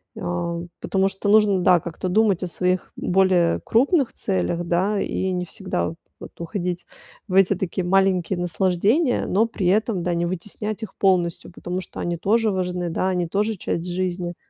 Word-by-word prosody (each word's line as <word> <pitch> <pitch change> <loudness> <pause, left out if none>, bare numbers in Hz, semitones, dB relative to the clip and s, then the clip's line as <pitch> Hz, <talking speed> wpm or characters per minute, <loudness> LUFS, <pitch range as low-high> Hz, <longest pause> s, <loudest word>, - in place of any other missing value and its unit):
Э, 170 -1 -3 0.2
потому 195 0 +1
что 195 +1 -5
нужно, 210 -3 +5
да, 180 -1 +5
как-то 170 +3 -5
думать 200 -1 +2
о - - -1
своих 180 +1 -1
более 180 -2 +2
крупных 270 +3 +2
целях, 95 - -1
да, 190 +4 +1
и 190 0 -1
не 180 -1 -1
всегда 190 -4 -3 0.3
вот - - -10
уходить 175 0 -3 0.4
в 185 - -6
эти 195 0 +5
такие 185 0 -3
маленькие 190 -1 +2
наслаждения, 195 - +1
но 210 +5 +3
при 225 -4 -4
этом, 205 -1 +1
да, 175 - 0
не 170 0 0
вытеснять 210 +5 -5
их 220 - -8
полностью, 180 -4 +1
потому 180 +1 -4
что - - -10
они 175 0 -1
тоже 220 +4 +2
важны, 180 -2 -2
да, 185 +3 0
они 180 -2 0
тоже 205 +4 -1
часть 170 0 -3
жизни. 175 -1 -2
185 Hz, 170 wpm, -23 LUFS, 175-200 Hz, 0.4 s, нужно